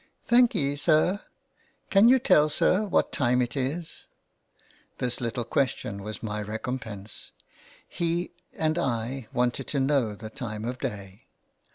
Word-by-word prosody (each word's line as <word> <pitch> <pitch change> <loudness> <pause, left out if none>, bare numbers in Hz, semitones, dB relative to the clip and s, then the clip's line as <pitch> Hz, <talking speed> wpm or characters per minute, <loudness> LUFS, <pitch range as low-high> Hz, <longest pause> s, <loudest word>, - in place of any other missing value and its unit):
" - - -42
Thankee, 215 - +4
sir. 155 +7 +3 0.7
Can 205 +4 +7
you 260 - +7
tell, 155 -11 +4
sir, 185 +7 +2
what - - +2
time 125 -1 +2
it 120 -1 -1
is? 150 +5 -4 0.5
" - - -34
This 125 0 -2
little 120 0 -2
question 115 -5 -1
was 105 +2 -7
my 105 -1 -3
recompense. 110 -1 -6 0.6
He 170 0 -2 0.3
and 155 +1 +1
I 120 -3 -2
wanted 125 +2 0
to 140 - -1
know 135 -6 +1
the 110 +1 -9
time 110 -2 -5
of 125 +1 -4
day. 100 0 -6
130 Hz, 145 wpm, -27 LUFS, 110-155 Hz, 0.7 s, Can